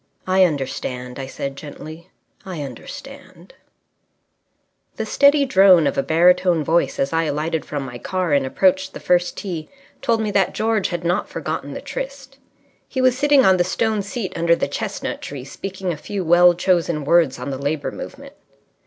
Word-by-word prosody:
"I 185 0 +4
understand," 130 -4 -4
I 135 - -5
said 135 0 -5
gently. 155 +4 -10 0.3
"I 180 -7 -6
understand." 140 - -11 1.4
The - - -3
steady 285 0 +4
drone 190 - +6
of 140 - 0
a - - +2
baritone 175 +2 +3
voice 160 -2 +1
as 135 +3 -1
I 165 0 +1
alighted 155 +2 -2
from 145 -2 -4
my 120 -2 -8
car 185 -1 -1
and 140 -1 +3
approached 190 +7 +1
the - - -6
first 175 0 +1
tee 170 -6 -5 0.3
told 230 -1 +1
me 215 -1 -1
that 195 -2 +1
George 220 -2 +1
had 175 -1 -4
not 175 +3 0
forgotten - - -4
the - - -6
tryst. 270 0 -7 0.5
He 260 - -4
was 255 -1 +4
sitting 285 0 +4
on 190 -1 +5
the 175 - +3
stone 215 +4 0
seat 200 0 -5
under 170 0 +3
the - - -1
chestnut - - -4
tree, 140 -3 -7
speaking 190 +5 -5
a - - -7
few 190 +4 -5
well 175 +1 +6
chosen 170 -4 0
words 160 -3 +3
on 125 +3 -5
the 135 - -4
Labour 145 +1 -2
Movement. - - -9
175 Hz, 175 wpm, -21 LUFS, 150-195 Hz, 1.4 s, drone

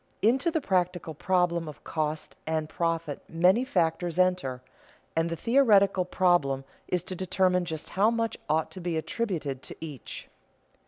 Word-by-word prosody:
_ - - +6
Into 265 +8 +3
the 320 -1 0
practical 180 - 0
problem 170 0 +1
of 150 - -10
cost 155 -1 -3
and 160 -1 0
profit 165 -2 -2
many 180 +8 +4
factors 175 - 0
enter, 180 -9 +1 0.5
and 165 +1 +1
the 165 - -2
theoretical 200 - +4
problem 175 -8 +2 0.2
is 180 -2 0
to 185 - -5
determine 180 0 +1
just 160 -2 -5
how 200 +3 +3
much 230 -1 -1
ought 155 +1 +1
to 185 - -8
be 170 -2 -1
attributed 160 - -2
to - - -8
each. 150 -6 -8
175 Hz, 155 wpm, -28 LUFS, 160-190 Hz, 0.5 s, _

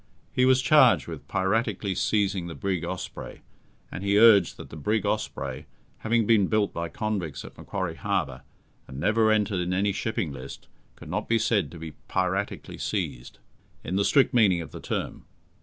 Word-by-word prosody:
He 125 - +3
was 130 0 +4
charged 130 -1 +5
with 75 -4 -8
piratically 100 0 0
seizing 100 -4 0
the 80 - -7
brig 90 +3 -2
Osprey, - - -6 0.5
and 95 - -6
he 100 0 +2
urged 105 -5 +6
that - - -10
the - - -8
brig 105 +8 -1
Osprey, 70 +2 -3 0.3
having 115 0 +1
been 105 -3 +4
built 105 0 +1
by 85 0 -3
convicts 90 -8 -3
at - - -12
Macquarie - - -4
Harbour, 65 0 -2 0.5
and 65 - -8
never 110 +6 +3
entered 105 -3 +1
in 90 +1 -1
any 100 +2 +1
shipping 95 -7 -2
list, 65 0 -9 0.3
could 75 - -11
not 105 +3 -3
be 115 - +4
said 115 -3 +1
to 85 - -11
be 80 0 -7 0.2
"piratically 95 +2 -2
seized", - - -3 0.5
in 90 - -3
the 100 - +2
strict 135 +4 +3
meaning 105 -7 +4
of 80 - -9
the - - -9
term. - - -4
100 Hz, 175 wpm, -26 LUFS, 85-110 Hz, 0.5 s, urged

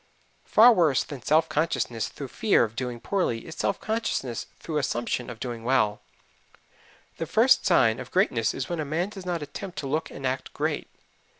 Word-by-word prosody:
Far 235 +3 +7
worse 160 - +3
than 140 -4 -8
self 155 +5 +3
consciousness 145 -8 -1
through 140 -3 -8
fear 220 - +3
of 110 -1 -4
doing 125 -1 -4
poorly 150 - -1
is 160 - -8
self 200 - -1
consciousness 215 - -2
through 155 -2 -3
assumption 120 -1 -2
of 120 -2 -8
doing 120 -2 -5
well. 115 -4 +1 1.2
The 165 - -3
first 225 - +4
sign 115 - +4
of - - -7
greatness 125 - +1
is 135 - -3
when 175 -2 -3
a - - 0
man 160 +6 -1
does 195 -3 -9
not 170 -3 -2
attempt 175 +6 -8
to 140 - -3
look 155 +4 -1
and 135 - -8
act 130 0 -2
great. - - -2
145 Hz, 185 wpm, -26 LUFS, 120-175 Hz, 1.2 s, Far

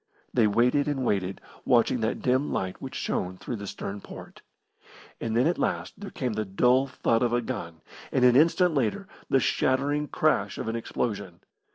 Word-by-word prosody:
They 115 -4 +4
waited 125 +7 +2
and 135 -3 -1
waited 95 -3 -1 0.2
watching 120 0 +3
that 110 0 -2
dim 130 +3 +1
light 95 -1 -3
which - - -7
shone 90 0 -2
through 120 - -5
the 100 0 -7
stem 100 +1 -6
port. - - -11 0.8
And 115 0 -1
then 125 - +4
at 175 - +1
last - - -1
there 205 -1 -8
came 125 -4 -3
the 110 - -1
dull 125 +7 +3
thud 115 -3 0
of 120 -1 +1
a 120 - +3
gun, 85 -10 -6 0.3
and 125 - +3
an 125 -1 +6
instant 170 +4 +4
later 140 - -1 0.2
the 135 - +4
shattering 140 +4 +1
crash 105 -12 +1
of - - -4
an 115 - -2
explosion. 100 -6 -3
120 Hz, 185 wpm, -27 LUFS, 105-135 Hz, 0.8 s, an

